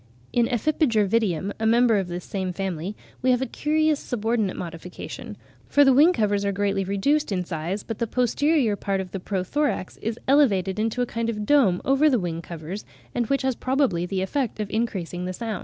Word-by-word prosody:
In 240 -1 +3
Ephippiger 240 -4 +2
vitium, 195 -4 0
a 220 - +1
member 230 -1 +4
of 190 - -3
this 175 0 -5
same 190 -2 -3
family, 190 0 -3 0.3
we 255 - +2
have 250 0 +3
a - - 0
curious 305 +3 +1
subordinate 225 -3 -1
modification; 175 0 -7 0.3
for 285 0 +5
the 270 - +6
wing 300 +7 +6
covers 205 - +1
are 200 - +1
greatly 200 0 0
reduced 210 +10 +1
in 180 -2 -1
size, 175 +4 -3
but 225 - -6
"the 235 - 0
posterior 250 0 +2
part 195 -1 -2
of 185 -1 -5
the 195 - -4
pro 185 0 -2
thorax 290 -3 -1
is 225 +1 -3
elevated 215 -9 +3
into 225 +3 0
a - - 0
kind 230 -1 -2
of 210 -2 -3
dome 220 -10 +3
over 275 +3 +4
the 260 - +3
wing 170 -4 -3
covers, 170 +4 -7 0.3
and 240 -2 0
which 275 +2 0
has 265 0 +1
probably 255 -11 0
the 190 0 -1
effect 250 +2 -2
of 210 -1 -3
increasing 190 -6 -2
the 185 - -3
sound." 220 -1 -4
215 Hz, 205 wpm, -24 LUFS, 190-255 Hz, 0.3 s, the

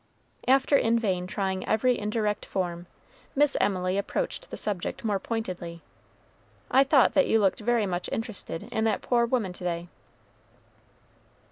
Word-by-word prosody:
After 270 +2 +4
in 230 -3 +3
vain 185 -5 -1
trying 190 0 -2
every 250 +3 +2
indirect 210 0 -1
form, 175 -2 -3 0.5
Miss 290 0 +3
Emily 185 -1 +1
approached - - -3
the - - -6
subject 200 0 -3
more 205 -3 +1
pointedly. 180 -7 -5 0.9
"I 265 +2 +6
thought 270 -2 +4
that 280 - +4
you 225 - +4
looked 195 -3 +2
very 230 0 +1
much 180 -2 -3
interested 220 -6 -4
in 220 0 -2
that 220 - 0
poor 235 -1 +2
woman 230 -7 0
to 180 - -11
day." 170 0 -3
210 Hz, 145 wpm, -27 LUFS, 185-235 Hz, 0.9 s, I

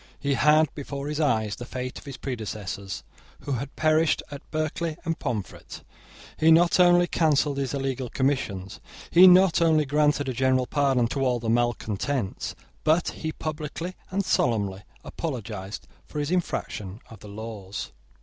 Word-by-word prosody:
He 140 0 0
had 150 +3 +4
before 140 -1 -5
his 150 0 -3
eyes 110 -9 +1
the - - -7
fate 125 +1 -5
of - - -16
his 140 -2 -7
predecessors 100 -6 -5 0.4
who - - -5
had 135 +2 -3
perished 155 0 +2
at 145 0 -7
Berkeley 155 +1 -2
and 165 0 -2
Pomfret. 115 -8 -5 0.6
He 160 - +5
not 170 +2 +5
only 175 0 +6
cancelled 150 -4 +2
his 135 0 -2
illegal 135 -2 -2
commissions; 110 -9 -1 0.3
he 180 +2 +9
not 185 -1 +6
only 160 -2 +4
granted 145 0 +2
a 130 - -1
general 130 +1 +2
pardon 135 -3 +2
to 135 +1 -1
all 125 -2 +2
the 115 -1 -1
malecontents; 115 -1 -1 0.3
but 160 +3 +3
he 160 - -4
publicly 155 +4 -5
and 195 +1 -1
solemnly 100 - +1 0.2
apologised 110 - -5 0.2
for - - -8
his 145 +2 -1
infraction 105 - -2
of 110 - -11
the 105 - -12
laws. 105 -2 -6
140 Hz, 155 wpm, -26 LUFS, 115-155 Hz, 0.6 s, he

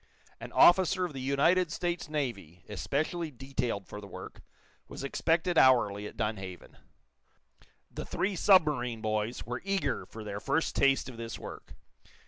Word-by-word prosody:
An - - -8
officer 185 +1 +5
of 170 - -6
the 135 - -6
United 155 +6 +2
States 175 -1 -2
Navy, 105 - -4
especially 155 +9 -2
detailed 130 -6 -3
for 105 - -8
the 100 - -10
work, - - -10 0.5
was - - -8
expected 165 +4 +1
hourly 105 -6 +4
at - - -12
Dunhaven. 95 -4 -4 1.2
The - - -6
three 195 +2 -1
submarine 150 - +3
boys 110 +2 -2
were 120 +1 -4
eager 195 -8 -1
for 110 - -9
their 100 -1 -5
first 160 +9 0
taste 135 -2 +3
of 130 -3 -9
this 115 -1 -6
work. - - -10
135 Hz, 145 wpm, -30 LUFS, 110-165 Hz, 1.2 s, officer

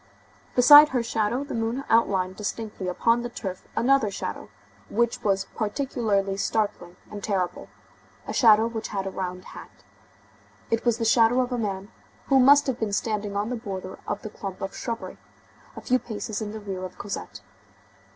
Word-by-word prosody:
Beside 290 +4 +9
her 250 -2 0
shadow, 225 +3 -1
the 285 - -7
moon 230 +4 -2
outlined 190 -5 +2
distinctly 210 -2 -5
upon 230 +6 +2
the 240 - -4
turf 190 -6 -7
another 265 -2 +3
shadow, 195 - -6 0.4
which 235 +1 0
was 195 -1 +1
particularly 210 -4 -1
startling 200 -4 -2 0.2
and 205 -1 -7
terrible, 185 -4 -2 0.6
a - - -4
shadow 220 -2 +6
which 225 -1 -4
had 195 -2 -3
a 195 - -3
round 180 -1 -5
hat. - - -13 0.9
It 230 +1 0
was 235 -2 +2
the 230 - -2
shadow 230 +2 +4
of 255 0 0
a 245 - -1
man, 200 -1 -4 0.4
who 270 -1 +5
must 280 +3 +6
have 260 -2 -2
been 215 -2 -2
standing 210 -1 -2
on 205 +2 -1
the 250 - -2
border 190 -4 -6
of - - -3
the 215 - -6
clump 195 -3 -7
of 195 - -5
shrubbery, 230 -1 -5 0.6
a - - -8
few 255 +1 +2
paces 220 -2 -5
in 210 -1 -4
the 220 - -6
rear 195 -3 -6
of 185 0 -8
Cosette. 105 - -6
215 Hz, 175 wpm, -25 LUFS, 195-235 Hz, 0.9 s, Beside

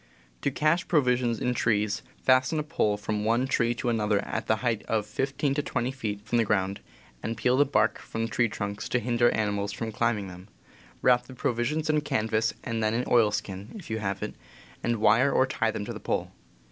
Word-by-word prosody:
To - - +1
cache 155 +4 +1
provisions 125 -6 +2
in 125 - 0
trees, 105 -3 +1 0.2
fasten 130 +4 +4
a 150 - 0
pole 110 -9 0
from 105 +1 -2
one 115 +4 +2
tree 120 -2 +1
to 125 - -4
another 105 -3 +1
at - - -4
a 110 - +5
height 115 -3 +1
of 110 -2 0
15 135 +6 -1
to 145 - 0
20 125 -3 -2
feet 105 -6 -5
from 120 +2 +1
the, - - +4
ground, 100 -2 0 0.4
and 115 0 -3
peel 125 +3 +2
the 145 +2 +5
bark 110 -6 +2
from 115 - -4
the 115 - -3
tree 120 -1 +2
trunks 100 0 -4
to 125 - +2
hinder 120 +1 +2
animals 105 -2 -1
from 110 +2 -4
climbing 110 -2 0
them; 90 +1 -11 0.6
wrap 125 -1 +4
the 130 - -11
provisions 125 +7 -1
in 155 -1 +2
canvas 110 -4 0
and 115 -2 -2
then 110 +1 +1
in 120 - 0
oilskin 105 - +1
(if 195 - -9
you 110 - -1
have 100 -2 -3
it), - - -4 0.5
and 120 - +1
wire 115 +6 +4
or 130 - +4
tie 125 -3 0
them 105 -1 -3
to - - -5
the - - -7
pole. - - -2
115 Hz, 210 wpm, -27 LUFS, 105-125 Hz, 0.6 s, a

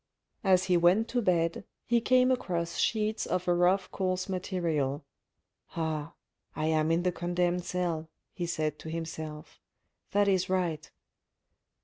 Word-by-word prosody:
As 185 -2 +4
he 180 -2 +3
went 180 +7 +4
to 245 0 0
bed, 170 -3 +1 0.2
he 240 -1 +2
came 255 +1 +4
across 170 -9 -1
sheets 215 -1 0
of 180 0 -1
a 175 - +4
rough 180 +2 +2
coarse 185 -1 -1
material. 165 -7 -1 0.3
" - - -29
Ah! 160 -1 -2 0.4
I 155 - -1
am 155 0 +2
in 165 +1 +2
the 180 - +2
condemned 175 0 -1
cell, 170 -3 -2 0.2
he 175 -3 -3
said 155 -3 -2
to 160 - -8
himself. 160 -2 -6 0.5
That 205 0 +2
is 190 -2 +2
right. 175 -5 -1
175 Hz, 145 wpm, -29 LUFS, 160-190 Hz, 0.5 s, As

